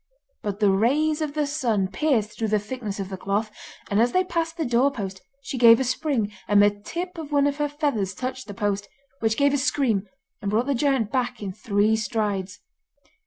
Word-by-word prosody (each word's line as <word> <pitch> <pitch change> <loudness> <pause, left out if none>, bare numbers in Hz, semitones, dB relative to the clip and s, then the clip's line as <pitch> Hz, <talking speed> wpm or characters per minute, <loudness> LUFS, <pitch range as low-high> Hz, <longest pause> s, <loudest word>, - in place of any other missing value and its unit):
But 205 -1 -4
the 205 -2 +4
rays 295 +10 +2
of 300 -1 -3
the 300 -1 +1
sun 240 -10 0
pierced 215 0 0
through 225 - 0
the 215 0 +2
thickness 210 -1 -5
of 195 -1 -4
the 190 - -5
cloth, 205 +3 -1 0.4
and 205 +2 +2
as 240 +1 +2
they 370 - +4
passed 335 -2 -2
the 320 - -1
doorpost 235 -7 0 0.2
she 265 - -4
gave 230 -1 +8
a - - +1
spring, 255 -4 -1 0.2
and 205 0 +5
the 205 0 +6
tip 340 - -6
of 305 -2 -7
one 285 -1 +3
of 285 0 0
her 295 -1 0
feathers 280 - -1
touched 260 +1 -5
the 205 - -7
post, 205 0 -1 0.3
which 220 0 +1
gave 280 0 +3
a 285 - +2
scream, 240 -7 +1 0.3
and 205 - -2
brought 220 +4 +1
the 280 - +1
giant 265 -4 +1
back 245 -4 -1
in 190 -2 -4
three 210 0 +1
strides. 205 -3 -2
230 Hz, 210 wpm, -24 LUFS, 205-285 Hz, 0.4 s, gave